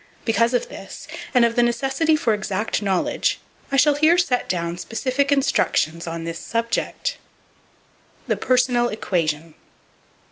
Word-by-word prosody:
Because 230 +2 +2
of 245 - 0
this, 195 +8 -10 0.2
and 245 -2 +5
of 230 0 0
the 240 - +4
necessity 270 +6 +2
for 235 -7 +1
exact 210 +1 -2
knowledge, 195 -3 0 0.3
I 275 - +2
shall 290 +3 +5
here 310 +4 +4
set 275 -9 +1
down 170 -1 -2
specific 260 +7 -1
instructions 170 - +1
on 165 0 -4
this 165 0 -5
subject. 230 - -2 1.1
The - - 0
Personal 250 -1 +2
Equation. 165 -7 -2
235 Hz, 135 wpm, -22 LUFS, 185-270 Hz, 1.1 s, and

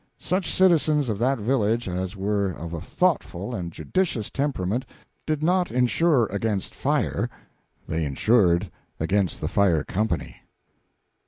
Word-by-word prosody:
Such 185 0 -1
citizens 155 -7 +3
of 105 -2 -2
that 130 +3 +2
village 115 0 0
as 90 +2 -3
were 100 0 0
of 85 -2 -7
a 80 - -4
thoughtful 130 - -1
and 90 -6 -4
judicious 165 - -1
temperament 130 -5 -1 0.4
did 155 -1 -1
not 180 +2 +2
insure 125 +2 +3
against 100 -1 -2
fire; - - 0 0.6
they 80 0 -1
insured 90 - +2 0.3
against 95 +2 0
the 75 - -1
fire 90 -4 +2
company. 85 - -2
105 Hz, 130 wpm, -25 LUFS, 90-140 Hz, 0.6 s, citizens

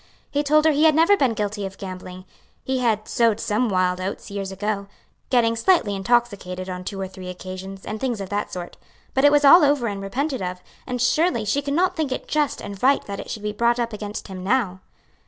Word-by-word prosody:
He 290 - +1
told 305 +1 +3
her 315 - +6
he 300 +2 +3
had 310 -2 +5
never 330 +6 +5
been 260 - +1
guilty 205 0 -2
of 195 0 -6
gambling; 185 -1 -8 0.4
he 260 0 -1
had 220 -3 0
"sowed 230 -3 +2
some 225 +3 0
wild 185 -1 +1
oats," 195 +2 -5
years 195 -1 -4
ago 200 +1 -3 0.4
getting 230 -3 +3
slightly 230 - +3
intoxicated 195 -4 0
on 180 -1 -5
two 195 +1 -5
or 190 - -3
three 185 -1 -9
occasions, 185 +1 -8
and 215 +1 -5
things 245 -5 -1
of 195 -2 -5
that 205 0 -2
sort 175 -1 -7 0.4
but 265 +1 +3
it 290 - +7
was 290 0 +4
all 340 +5 +9
over 285 -4 +3
and 200 -3 -3
repented 260 +7 -2
of; 180 0 -4 0.3
and 250 -1 -3
surely 310 +2 +2
she 275 +8 +1
could 280 0 -2
not 365 +3 +2
think 310 -5 -1
it - - -4
just 300 -2 0
and 200 -1 -7
right 275 +2 +3
that 200 -1 -6
it - - -8
should 215 - -5
be 210 - -1
brought 235 +3 +2
up 235 -1 -1
against 210 0 -6
him 185 -2 -7
now. 195 -4 0
215 Hz, 230 wpm, -23 LUFS, 195-265 Hz, 0.4 s, all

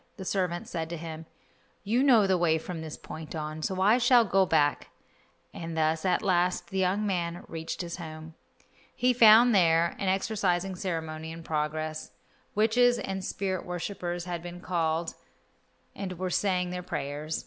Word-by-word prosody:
The 190 - -7
servant 180 -3 -1
said 165 -2 -4
to 170 - -4
him, 160 0 -8 0.6
"You 230 +5 +1
know 245 -7 +5
the 190 -1 +3
way 170 -2 +2
from 165 +1 -6
this 160 -1 -7
point 160 +1 -8
on, 155 0 -5
so 185 +4 -2
I 210 +6 +4
shall 245 -1 +5
go 195 -2 +3
back," 150 -3 +1 0.6
and 165 -1 -6
thus 160 +1 +1
at 185 +2 +1
last 180 -2 +1
the 190 - -1
young 190 +3 +1
man 175 -3 -2
reached 165 +2 -5
his 170 0 -6
home. 160 -1 -9 0.6
He 250 0 +2
found 235 0 +7
there 170 -3 +3
an 195 - -2
exorcising 190 -2 0
ceremony 160 -4 -4
in 165 0 -9
progress. 155 0 -3 0.4
Witches 240 +3 +4
and 190 0 -4
spirit 190 -1 -2
worshippers 175 -1 -4
had 175 -2 -4
been 175 0 -8
called 165 -2 -1 0.8
and 185 -3 -5
were 185 0 -3
saying 180 -2 0
their 180 0 -4
prayers. 150 -2 -4
175 Hz, 165 wpm, -28 LUFS, 160-195 Hz, 0.8 s, found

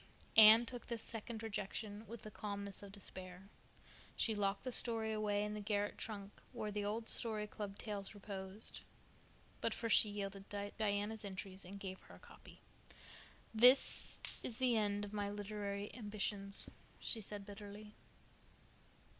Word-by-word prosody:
Anne 220 +2 +10
took 245 0 -6
this 235 -2 -3
second 225 0 -5
rejection 210 0 -4
with 230 -1 -7
the 215 - -7
calmness 200 -2 -3
of 200 -1 -9
despair. 185 -1 -5 0.7
She 225 - +2
locked 200 -1 0
the 255 - -2
story 225 -2 +2
away 210 -1 +1
in 210 0 -2
the 210 - -4
garret 205 0 0
trunk 205 -2 -5 0.2
where 210 - -3
the 205 0 -1
old 220 +2 -2
Story 215 -2 0
Club 205 -1 -6
tales 205 -2 -4
reposed; 195 +1 -6 0.8
but 230 - +1
first 230 -2 +3
she 215 - +5
yielded 200 -1 -5
to 205 0 -3
Diana's 210 0 0
entreaties 195 -1 -6
and 200 +2 -8
gave 190 -1 -5
her - - -14
a - - -15
copy. - - -15 0.9
"This 250 +4 +6 0.2
is 225 - -3
the 255 -2 +3
end 205 -1 +1
of 205 - -9
my 205 -1 -1
literary 205 0 -4
ambitions," 205 -3 0 0.3
she 225 - -1
said 205 -1 -6
bitterly. 205 +1 -9
205 Hz, 155 wpm, -38 LUFS, 200-220 Hz, 0.9 s, Anne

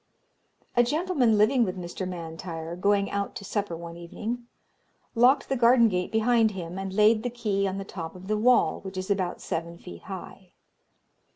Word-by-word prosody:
"A 240 - +6
gentleman 275 - +2
living 240 +4 +4
with 185 -3 -2
Mr. 180 +1 -5
M'Intyre, 165 -1 -6
going 200 +2 +1
out 200 0 -2
to 200 - -7
supper 200 -4 -2
one 170 0 -8
evening, 225 +8 -5 0.7
locked 250 +4 +4
the 270 - 0
garden 235 -1 +5
gate 180 -2 -2
behind 225 0 +3
him, 175 +1 -5
and 195 0 -4
laid 215 +2 +4
the 245 - -2
key 210 -5 -1
on 190 0 -3
the 195 - -5
top 165 -4 -7
of 185 +1 -11
the 215 - +1
wall, 245 +4 +3
which 190 -1 -8
is 185 +2 -3
about 185 -3 -1
seven 170 +1 -4
feet 85 - -11
high. - - -9
200 Hz, 180 wpm, -27 LUFS, 180-230 Hz, 0.7 s, A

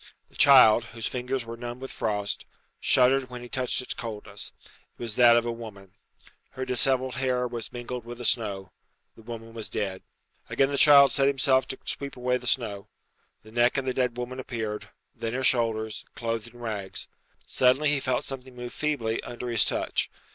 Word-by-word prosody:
The - - -24
child, 125 -5 +7
whose 115 - -4
fingers 125 0 -2
were 115 0 -6
numbed 120 +1 -6
with 135 0 -7
frost, 105 -2 -2 0.3
shuddered 130 +1 +3
when 125 -1 -8
he - - -8
touched 125 +1 0
its - - -3
coldness. 105 -3 -6
It - - -19 0.3
was 115 -3 -2
that 120 -1 +7
of 120 - +1
a 120 - -1
woman. 105 -5 -9 0.6
Her 130 - -4
dishevelled 130 +1 +1
hair 125 -1 0
was 120 -2 -6
mingled 120 0 -6
with 120 +1 -8
the 120 - -6
snow. 100 -6 0 0.4
The - - -15
woman 115 0 -8
was 115 -2 -4
dead. 95 -2 -3 0.5
Again 135 0 +2
the 140 - -1
child 140 -2 +8
set 135 -1 +3
himself 130 -1 +3
to 130 - -5
sweep 140 -2 -4
away 125 0 +1
the 125 0 -8
snow. 110 -6 -1 0.6
The 110 - -15
neck 120 +3 +3
of 135 - -1
the 130 - 0
dead 125 -2 0
woman 125 +1 -5
appeared; 110 -4 -4 0.2
then 115 0 -4
her 130 - -2
shoulders, 110 -3 +1
clothed 115 -1 -3
in 120 +1 -14
rags. 105 -5 -4 0.4
Suddenly 130 +4 +3
he 145 -1 +2
felt 130 -2 -1
something 130 -1 -7
move 120 0 -7
feebly 130 -8 -1
under 120 +1 -6
his 115 -4 +4
touch. - - 0
120 Hz, 190 wpm, -27 LUFS, 115-130 Hz, 0.6 s, child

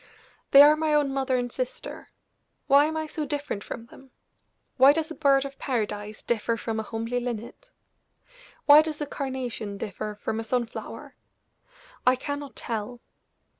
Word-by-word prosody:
They 280 +1 +10
are 300 +1 +7
my 310 -1 +1
own 285 -2 +2
mother 265 -1 0
and 245 -1 -2
sister - - -6 0.6
why 280 +1 +6
am 315 +1 -2
I 315 - -2
so 310 0 -4
different 290 -8 -4
from 230 - -7
them? 265 +3 -16 0.7
Why 270 +2 +8
does 320 +1 -2
a - - -3
bird 275 -3 +3
of 275 0 -8
paradise 210 -4 -3
differ 230 0 0
from 225 0 -3
a - - 0
homely 230 +3 -3
linnet? 240 -2 -6 1.0
Why 295 +1 +9
does 310 -1 -5
a 295 - -2
carnation 255 -7 -4
differ 210 +1 -5
from 220 +1 -2
a - - -3
sun 240 +2 0
flower? 225 - -9 0.9
I 255 +1 +5
cannot 285 +1 -5
tell." 230 +1 -5
260 Hz, 165 wpm, -26 LUFS, 225-290 Hz, 1.0 s, They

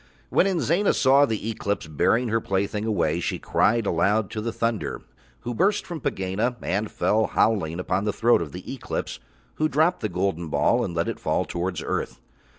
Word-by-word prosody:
When - - +4
Inzana 175 - +2
saw 140 +2 +5
the 110 -2 -3
Eclipse 100 -4 -2
bearing 115 - +1
her 115 +1 +1
plaything 100 +2 -1
away 85 -7 +1
she - - -2
cried 115 +1 +1
aloud 100 +4 +1
to 110 - -3
the 115 +2 -2
thunder, 110 -9 -2 0.4
who 120 - -4
burst 195 - +1
from 170 -3 -6
Pegāna 105 -1 -1
and 105 +2 -1
fell 110 +1 +1
howling 90 -7 +1
upon 95 +2 -1
the 105 - +1
throat 120 -3 +3
of 80 -4 -5
the - - -7
Eclipse, - - -4 0.4
who 155 0 +1
dropped 160 +6 +2
the 110 - -2
golden 90 -2 -1
ball 80 +12 +2
and 85 - -4
let 85 - 0
it - - -4
fall - - 0
towards 90 0 -3
earth. - - -3
110 Hz, 185 wpm, -25 LUFS, 95-120 Hz, 0.4 s, saw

